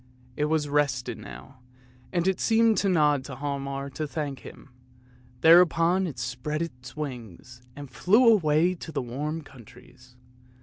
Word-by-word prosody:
It 150 - 0
was 155 -1 0
rested 140 -3 -1
now, 130 -1 -12 0.5
and 175 0 0
it 190 - +1
seemed 225 -1 +3
to 200 - +1
nod 150 -6 +2
to 135 - -7
Hialmar 140 0 -4
to 155 +3 -4
thank 145 -3 -4
him; 135 - -13 0.7
thereupon 170 +2 +5
it 150 - -7
spread 125 +6 -3
its 125 -4 -10
wings 125 - -8
and 145 0 -8
flew 215 - +3
away 175 -5 +4
to 165 -2 -9
the 140 - -3
warm 150 +6 -4
countries. 125 0 -17
145 Hz, 145 wpm, -26 LUFS, 130-165 Hz, 0.7 s, thereupon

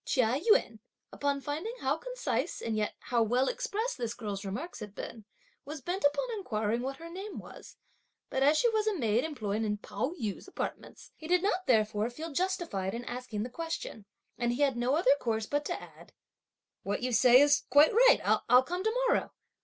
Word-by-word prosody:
Chia 255 0 +1
Yün, 230 - +3 0.3
upon 285 -1 -1
finding 320 - -4
how 270 +2 +1
concise - - -3
and 225 -1 -2
yet 215 -1 -1
how 240 -2 0
well 245 +4 +2
expressed 475 - -2
this 235 -1 -3
girl's 205 -4 -5
remarks 245 - -5
had 210 -1 -8
been, 220 -3 -8 0.4
was 300 +2 -7
bent 360 +7 -4
upon 285 +13 +2
inquiring 230 - -1
what 270 +2 -3
her 330 - -9
name 385 +5 -7
was; - - -11 0.5
but 265 - -1
as 290 +3 +5
she 480 - +4
was 435 -1 0
a 430 - +2
maid 230 -3 +1
employed 220 -9 -2
in 210 -1 -1
Pao 220 +8 -3
yü's 215 - -4
apartments, 385 - -6
he 315 - -9
did 360 +1 +3
not 375 -2 0
therefore 215 -2 +2
feel 315 +7 -7
justified 330 - -1
in 240 +1 -6
asking 245 -4 -4
the 245 - -5
question, 325 -9 -5 0.3
and 240 0 +1
he 280 +4 +1
had 275 -3 +2
no 245 +3 +1
other 285 -4 +4
course 220 -2 -1
but 290 +5 -1
to - - -3
add, - - -14 0.7
"What 205 +4 -3
you 255 - 0
say 245 +2 +7
is 290 0 +5
quite 290 +2 +6
right, - - +6 0.3
I'll 250 +1 +7
come 355 +6 -3
to - - +1
morrow!" 480 - +1
270 Hz, 195 wpm, -30 LUFS, 225-345 Hz, 0.7 s, say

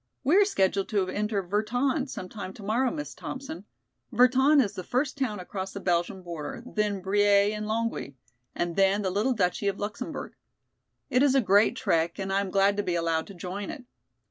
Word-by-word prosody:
"We 290 +6 +3
are 410 - +6
scheduled 195 - +1
to 200 -4 +1
enter 205 0 -1
Virton 245 - 0
some 185 - -6
time 190 -1 -7
tomorrow, 220 +6 0
Miss 295 +1 -5
Thompson. 280 +4 -7 0.5
Virton 260 +5 +5
is 205 -7 +2
the 185 -2 -6
first 265 - -1
town 250 -7 -2
across 190 +1 -5
the 200 - -5
Belgian 180 +1 -1
border, 170 +4 -6
then 210 -4 -1
Briey 205 +1 +3
and 210 0 -4
Longwy 220 -10 -2 0.4
and 175 -1 -2
then 195 +1 +3
the 190 - 0
little 215 +7 +1
Duchy 200 -1 0
of 200 0 0
Luxemburg. 205 +4 -5 0.8
It 250 - +4
is 275 -1 +4
a - - +6
great 205 -2 +4
trek 165 -3 0
and 195 -1 -3
I 195 - +2
am 200 - -3
glad 195 +1 +3
to - - +2
be 180 -2 -1
allowed 165 -1 0
to 200 - -11
join 185 +3 -5
it. 285 -6 -8
205 Hz, 195 wpm, -27 LUFS, 190-245 Hz, 0.8 s, are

